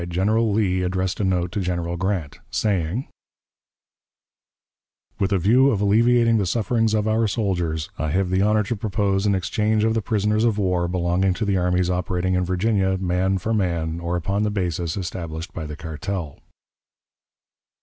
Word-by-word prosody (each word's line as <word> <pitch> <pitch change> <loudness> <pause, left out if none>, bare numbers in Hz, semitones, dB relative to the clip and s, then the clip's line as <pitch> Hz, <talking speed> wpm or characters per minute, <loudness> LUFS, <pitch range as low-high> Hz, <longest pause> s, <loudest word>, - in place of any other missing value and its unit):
General 105 +6 +1
Lee 95 -3 +1
addressed 95 0 -1
a - - 0
note 90 -2 0
to 105 - -2
General 85 -2 -2
Grant, 90 -5 -2
saying: 100 - -1 2.1
"With 95 - 0
a 100 - +3
view 120 +10 +4
of 110 - 0
alleviating 115 +2 +3
the 100 - 0
sufferings 115 +3 +1
of 105 0 0
our 110 +1 +2
soldiers, 85 -7 -2
I 80 +2 -1
have 90 +3 0
the 95 +1 +2
honor 105 +1 +3
to 110 +4 -2
propose 100 -1 0
an 100 - +3
exchange 105 +3 0
of 110 0 +2
the 115 - 0
prisoners 105 +1 0
of 115 -3 +2
war 90 -3 +1
belonging 90 +1 +1
to 110 - -2
the 100 -1 +1
armies 90 0 +1
operating 90 0 -1
in 90 0 +1
Virginia, 95 +1 +1
man 95 +1 0
for 110 +5 -2
man, 85 -5 -1
or 85 +1 -2
upon 100 +4 -1
the 105 - +1
basis 90 -4 -2
established 85 -3 -5
by 80 -2 -5
the 75 - -6
cartel." 80 0 -5
95 Hz, 170 wpm, -23 LUFS, 90-105 Hz, 2.1 s, view